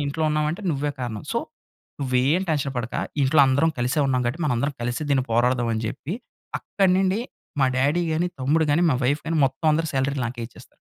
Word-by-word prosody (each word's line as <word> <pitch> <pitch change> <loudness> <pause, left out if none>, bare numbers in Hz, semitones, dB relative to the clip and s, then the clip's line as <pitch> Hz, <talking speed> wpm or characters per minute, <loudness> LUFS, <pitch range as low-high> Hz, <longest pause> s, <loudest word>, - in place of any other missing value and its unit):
ఇంట్లో 150 +3 -2
ఉన్నామంటే 150 +6 -1
నువ్వే 145 0 -1
కారణం. 115 -4 -4
సో - - +1 0.6
నువ్వేం 135 +6 +2
టెన్షన్ 140 -3 0
పడక 120 0 -3 0.3
ఇంట్లో 140 +2 +4
అందరం 140 +5 +3
కలిసే 125 +5 0
ఉన్నాం 130 -1 +1
కాబట్టి 130 +8 -2
మనం 140 -4 +1
అందరం 140 +2 -1
కలిసి 120 +5 -2
దీన్ని 135 -2 +3
పోరాడదామని" 120 -1 +1
చెప్పి 150 - -5 0.4
అక్కడి 190 -2 +1
నుండి 195 +3 +1 0.4
మా 135 - +5
డ్యాడీ 145 +7 +2
గానీ, 170 +3 +1
తమ్ముడు 155 +5 +2
గానీ, 165 +4 +3
మా - - +3
వైఫ్ 145 +4 +2
గానీ 165 0 0
మొత్తం 135 +5 -4
అందరూ 160 +2 +1
సాలరీలు 135 0 0
నాకే 120 0 -6
ఇచ్చేస్తారు. - - -17
140 Hz, 185 wpm, -24 LUFS, 125-160 Hz, 0.6 s, మా